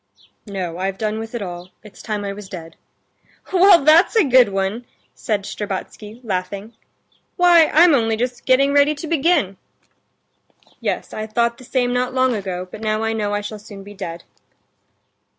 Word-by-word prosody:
"No, 180 -4 -5
I've 190 +1 -2
done 215 +1 -2
with 225 +1 -7
it 230 - -3
all. 175 -1 -8
It's 210 - -14
time 210 -2 -4
I 200 - -3
was 200 -1 -10
dead." 165 -4 -9 0.8
"Well, 365 -3 +6
that's 325 +8 +5
a 445 - +5
good 255 -5 +5
one!" 195 +5 -2 0.3
said 210 -3 -2
Shtcherbatsky, 210 +3 -6
laughing; 195 +1 -4 0.6
"why, 350 -3 +6
I'm 335 +1 +5
only 225 -4 +1
just 245 +1 -4
getting 275 +2 +4
ready 285 +1 +4
to 295 - -7
begin." 305 - +1 1.2
"Yes, - - -3
I 215 0 -5
thought 235 +2 0
the - - -13
same 245 -1 -1
not 250 +1 -1
long 260 -1 +2
ago, 185 -4 -4
but 215 - -9
now 215 0 -1
I 225 0 -1
know 205 -2 -2
I 205 - -2
shall 210 +1 -7
soon 205 -2 -11
be 205 +1 -12
dead." 170 -3 -7
220 Hz, 170 wpm, -20 LUFS, 200-255 Hz, 1.2 s, Well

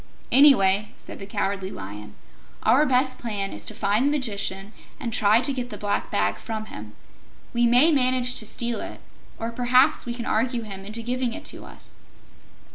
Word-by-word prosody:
"Anyway," 215 -8 +5
said - - -11
the 195 - -8
Cowardly 195 -1 -2
Lion, 105 - -9 0.5
"our 295 +4 +4
best 255 0 +1
plan 205 -5 -3
is 105 - -8
to - - -6
find 210 +7 +1
the - - +3
Magician 205 -7 -2 0.3
and 235 -5 -4
try 215 +1 +4
to 270 +2 0
get 250 -2 -4
the - - -7
Black 205 -1 -2
Bag 100 0 0
from 215 - -5
him. 105 - -10 0.6
We 235 0 +3
may 250 +8 +5
manage 255 -3 +2
to 220 - -3
steal 235 +1 -2
it, - - -8 0.4
or 230 +1 -4
perhaps 250 +2 +3
we 235 - -3
can 235 -1 -5
argue 235 +2 0
him 195 -2 -8
into 220 +3 -4
giving 250 0 -1
it - - -8
to - - -10
us." - - -14
230 Hz, 185 wpm, -24 LUFS, 200-250 Hz, 0.6 s, Anyway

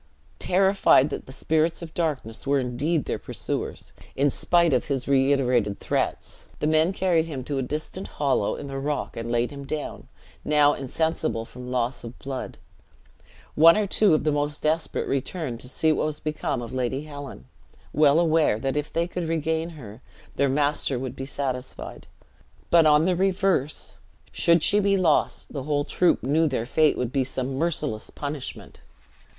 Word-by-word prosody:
Terrified 190 -6 +4
that - - -5
the - - -9
spirits 160 +5 0
of 160 -1 -9
darkness 140 -9 -3
were 140 0 +3
indeed 135 +5 -1
their - - -3
pursuers, - - -5 0.2
in 140 +1 +2
spite 170 0 +2
of 125 - +1
his 135 -4 -2
reiterated 130 -6 +2
threats, - - -3
the - - -1
men 155 +3 +3
carried 180 -4 +1
him 140 -6 -5
to 140 +1 -3
a - - 0
distant 155 +8 -4
hollow 135 -8 +1
in - - -7
the 135 -1 -5
rock, 145 +1 -3
and 115 +1 -4
laid 120 +2 +1
him 140 -1 -8
down, 150 +1 -5 0.4
now 150 -1 +4
insensible 150 -3 -2
from 125 +1 -10
loss 125 0 -1
of 120 +1 -9
blood. 135 -1 -6 1.0
One 165 +4 +7
or 215 - +1
two 195 -3 +4
of - - 0
the 155 - +2
most 145 0 -2
desperate 155 +1 0
returned 135 -2 -3
to 125 - -7
see 160 +4 +2
what 155 - +1
was 150 -1 -3
become 155 -5 -3
of 115 - -8
Lady 130 +2 -2
Helen; 145 - -9 0.5
well 150 +1 +5
aware 160 -9 +3
that 135 +4 -2
if 150 0 -2
they 170 +1 0
could 175 -1 -4
regain 160 0 -1
her, 125 -8 -11 0.3
their 140 - +2
master 145 -1 +1
would 130 0 -5
be 135 - -5
satisfied; 130 -2 -5 0.6
but, 165 -2 +6
on 150 +1 +5
the 185 0 +2
reverse, 190 -5 0 0.3
should 170 -1 +3
she 205 - +5
be 200 -1 +2
lost, 170 -5 +1
the 140 - -3
whole 145 +1 0
troop 180 +4 +1
knew 155 +5 +2
their 130 -5 -1
fate 155 +4 +3
would 125 -1 -2
be 135 -1 +1
some 130 0 -3
merciless 150 -9 -2
punishment. 145 -2 -7
145 Hz, 175 wpm, -25 LUFS, 130-160 Hz, 1.0 s, One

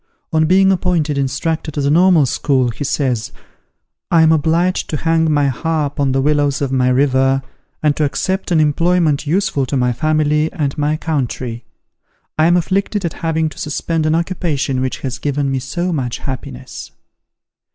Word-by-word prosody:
On 160 0 +3
being 190 +2 +4
appointed 175 -5 0
Instructor 140 +4 -2
to 150 - -5
the 140 0 +1
Normal 175 -2 +5
School, 130 -1 +1
he 115 - -6
says, 130 -6 -1 0.8
"I 165 -1 +5
am 160 - +5
obliged 165 +4 +1
to 155 - -2
hang 160 +1 +1
my 145 -1 +2
harp 150 +2 -2
on 140 -2 +2
the 135 0 +1
willows 145 -1 +1
of 140 -2 -2
my 130 -1 +2
river, 135 0 +2 0.4
and 150 -1 +3
to 155 - +1
accept 190 +6 -1
an 170 -3 +3
employment 155 0 +2
useful 160 -5 0
to 140 - -1
my 125 -1 +1
family 155 +2 +1
and 145 -6 -2
my 150 +1 0
country. 125 -6 -3 0.7
I 155 +1 +3
am 175 +1 +4
afflicted 195 +3 -1
at 165 - -2
having 160 -1 0
to - - -13
suspend 155 +1 -2
an 155 - +2
occupation 165 -6 -1
which 130 0 -3
has 130 -2 -4
given 145 -1 -1
me 135 - 0
so 175 +7 -3
much 125 -6 -2
happiness." 130 -3 -7
150 Hz, 170 wpm, -17 LUFS, 135-165 Hz, 0.8 s, Normal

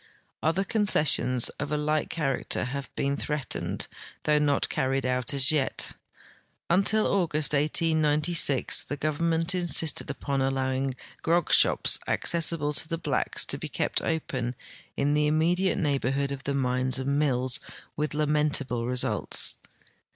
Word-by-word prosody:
Other 165 +5 +1
concessions 155 - +2
of 145 0 -4
a 150 - 0
like 150 +1 -1
character 135 -5 -2
have 135 +2 -5
been 140 0 -1
threatened, 150 -2 -2 0.4
though 150 0 +2
not 145 -1 +1
carried 135 0 -1
out 125 -1 -1
as 135 0 +7
yet. 145 -4 0 0.8
Until 200 +4 +3
August, 155 -6 0
1896, 150 -1 +2
the 145 - -6
government 165 +3 0
insisted 175 -3 0
upon 140 -1 -3
allowing 135 0 -1 0.3
grog 170 0 +1
shops - - +4
accessible 165 -3 +1
to 160 - +1
the 165 - -3
blacks 165 - 0
to - - -2
be - - -6
kept - - -1
open 130 -6 -3 0.4
in 145 +1 +1
the 150 0 +2
immediate 170 +5 +1
neighborhood 140 -2 -1
of 135 -1 -6
the 140 - -1
mines 130 0 0
and 140 +2 -1
mills, 130 -3 +1 0.4
with 150 0 -3
lamentable 150 -5 0
results. 125 0 0
150 Hz, 135 wpm, -27 LUFS, 135-160 Hz, 0.8 s, as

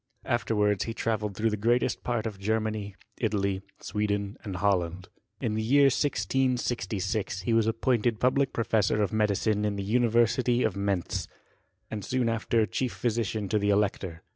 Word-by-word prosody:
Afterwards 105 -4 +1
he 115 - -4
travelled 105 -3 -2
through 115 +1 +1
the 105 - -1
greatest 120 +4 +1
part 120 -2 -1
of 105 -3 -5
Germany, 110 -1 -2 0.2
Italy, 100 -4 0 0.2
Sweden, 100 -1 -2
and 100 -3 -5
Holland. 90 -2 0 0.3
In 110 - -1
the 110 - -1
year 135 +5 +5
1666 110 -6 -1
he 115 +5 0
was 115 -1 +3
appointed 115 -1 +1
public 130 +2 +2
professor 110 -2 +1
of 105 - -2
medicine 105 0 +1
in 105 -1 0
the 100 - -3
University 120 +2 +2
of 110 - 0
Mentz, 100 -3 -1 0.6
and 105 -2 -4
soon 125 +2 0
after 115 0 +1
chief 120 +6 -2
physician 110 -3 -1
to 105 - +2
the 100 0 +1
elector. 100 -4 0
110 Hz, 155 wpm, -28 LUFS, 100-115 Hz, 0.6 s, year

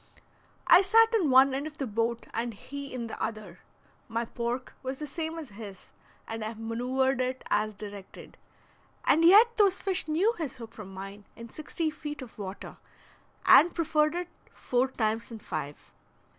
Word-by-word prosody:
I - - +8
sat 455 +4 +5
in 380 -10 +3
one 265 +1 +6
end 280 +3 -2
of 305 0 -11
the 275 - -2
boat 230 +1 -1
and 230 -1 -3
he 280 +5 -8
in 250 -2 -4
the 225 - -7
other; 215 -5 -5 0.5
my 230 +1 -2
pork 235 +2 -4
was 265 0 -4
the 300 - -5
same 320 +3 -4
as 310 -5 -7
his, 200 -2 -11 0.4
and 225 -1 -5
I 220 +1 -4
maneuvered 250 +4 0
it 255 +1 -2
as 215 0 +1
directed, 200 -1 -10 0.7
and 325 - +4
yet 435 +7 +7
those 400 -3 +4
fish 375 -3 0
knew 360 +9 +2
his 310 -5 -3
hook 230 -2 -10
from 200 -3 -10
mine 195 +2 -9
in 230 0 -10
sixty 310 +1 -3
feet 295 -2 -7
of 230 -3 -14
water, 195 -1 -7 0.7
and 345 +3 +7
preferred 310 -1 +1
it 355 0 -3 0.2
four 250 +1 0
times 225 -3 -1
in 230 - -7
five. 155 -8 -7
255 Hz, 170 wpm, -28 LUFS, 220-310 Hz, 0.7 s, I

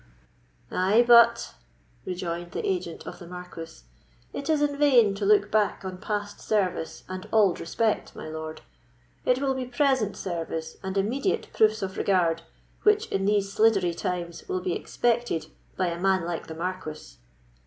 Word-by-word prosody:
"Ay, 200 +6 +3
but," 235 - +6 0.5
rejoined 175 -1 -4
the - - -2
agent 180 -3 -3
of - - -8
the 175 - -10
Marquis, 180 - -9 0.5
"it 280 - -5
is 310 -2 +3
in 290 -1 +1
vain 255 -8 +5
to 200 0 -2
look 205 0 +4
back 210 -2 +1
on 185 -1 -5
past 205 0 -3
service 185 -6 -1
and 185 0 -7
auld 205 -5 +4
respect, 215 +6 -1
my - - -7
lord; 155 0 -6 0.6
it 250 0 +3
will 275 -1 +1
be 260 -1 -3
present 250 -4 +1
service 165 -3 -4
and 190 0 -4
immediate 250 - 0
proofs 215 -1 +3
of 190 0 -4
regard 170 -4 +2 0.4
which, 425 +1 +4
in 195 0 0
these 200 -1 +1
sliddery 195 -6 +3
times, 175 - -4
will 370 -1 -1
be 365 - -1
expected 235 - -1 0.3
by 185 - +1
a 170 -1 -2
man 190 -2 +2
like 170 -1 -4
the 160 - -7
Marquis." 160 - -5
195 Hz, 160 wpm, -26 LUFS, 175-230 Hz, 0.6 s, but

